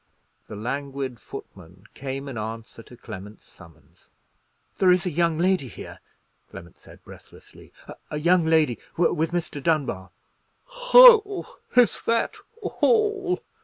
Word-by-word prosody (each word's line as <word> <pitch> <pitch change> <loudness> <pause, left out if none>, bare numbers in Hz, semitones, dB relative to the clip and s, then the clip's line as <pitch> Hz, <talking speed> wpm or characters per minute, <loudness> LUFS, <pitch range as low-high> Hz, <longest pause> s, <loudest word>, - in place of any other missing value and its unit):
The - - -9
languid 135 +2 -5
footman 90 +4 -12
came 135 +1 -6
in 135 - -7
answer 110 +1 -7
to 120 +2 -16
Clement's 105 -1 -11
summons. 80 -3 -20 0.7
"There 185 - +4
is 180 +1 +3
a 180 - -2
young 165 0 0
lady 180 -4 +1
here," 115 - -11 0.5
Clement 85 -1 -13
said, - - -18
breathlessly; - - -16 0.4
"a 150 - -4
young 170 +3 +3
lady—with 160 +1 0
Mr. 170 -4 -4
Dunbar." 135 - -1 0.5
"Ho! - - +6 0.3
is 245 -4 +3
that 230 - 0 0.3
hall?" 415 -4 0
155 Hz, 120 wpm, -24 LUFS, 115-190 Hz, 0.7 s, Ho